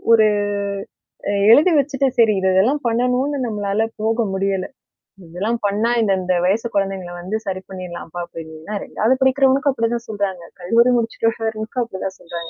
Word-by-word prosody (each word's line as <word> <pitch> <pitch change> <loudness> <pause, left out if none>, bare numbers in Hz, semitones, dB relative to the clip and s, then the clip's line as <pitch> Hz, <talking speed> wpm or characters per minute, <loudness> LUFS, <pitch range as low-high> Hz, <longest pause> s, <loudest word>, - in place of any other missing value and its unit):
ஒரு 220 -1 +6 1.0
அ - - 0 0.2
எழுதி 310 +8 +6
வச்சுட்ட 275 -1 +1
சரி 225 -2 +6
இது 190 0 +1
இதெல்லாம் 245 +11 +3
பண்ணணும்னு 250 +4 +1
நம்மளால 205 -1 -1 0.2
போக 225 +2 +1
முடியல. 195 -1 -1 0.6
இதெல்லாம் 200 +8 -2
பண்ணா 210 +3 +1
இந்த, 215 -3 +2
இந்த 185 0 0
வயசு 220 +5 +1
குழந்தைங்கள 195 -3 -2
வந்து 185 +5 -4
சரி 185 -1 -3
பண்ணிர்லாம்ப்பா 175 -2 -7
அப்டின்ன்னா 160 +2 -9
2வது 230 +5 +1
படிக்கிறவனுக்கும் 270 +1 +3
அப்படிதான் 235 -1 -2
சொல்றாங்க. 200 -4 -3 0.2
கல்லூரி 230 +7 +4
முடிச்சுட்டுனுக்கும் 225 0 -1
அப்படிதான் 190 -4 -6
சொல்றாங்க. 170 -1 -7
215 Hz, 140 wpm, -20 LUFS, 190-235 Hz, 1.0 s, ஒரு